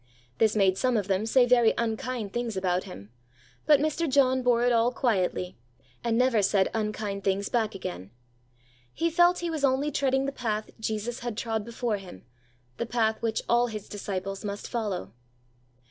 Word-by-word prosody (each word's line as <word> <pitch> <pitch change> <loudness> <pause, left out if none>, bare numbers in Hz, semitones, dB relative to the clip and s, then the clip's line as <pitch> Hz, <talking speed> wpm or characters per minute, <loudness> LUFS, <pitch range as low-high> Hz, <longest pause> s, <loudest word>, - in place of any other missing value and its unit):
This 220 -1 +3
made 195 -2 +3
some 255 -2 +2
of 200 -3 -1
them 195 +2 0
say 250 +2 +5
very 240 -2 +4
unkind 225 -2 -2
things 240 -4 -2
about 185 -1 0
him; 100 +4 -11 0.6
but 300 -2 +6
Mr. 310 +2 0
John 260 -1 +3
bore 245 -1 +3
it 245 - +3
all 230 +1 +3
quietly, 185 - -1 0.4
and 230 -1 +1
never 250 -3 +3
said 195 -1 +2
unkind 210 -2 -3
things 195 +1 0
back 220 -4 0
again. 95 - -6 0.9
He 335 0 0
felt 350 +2 +4
he 335 - -1
was 310 -3 -3
only 275 +2 +2
treading 270 -1 +1
the 275 - -1
path 215 -5 -3
Jesus 220 +2 -3
had 240 -3 -5
trod 225 -2 -2
before 235 -1 -2
him, 180 - -12 0.5
the 235 - -3
path 220 -2 0
which 225 -1 -1
all 240 +1 +3
His 215 -3 -7
disciples 195 -1 -5
must 205 -1 -5
follow. 200 - -3
225 Hz, 175 wpm, -27 LUFS, 200-250 Hz, 0.9 s, but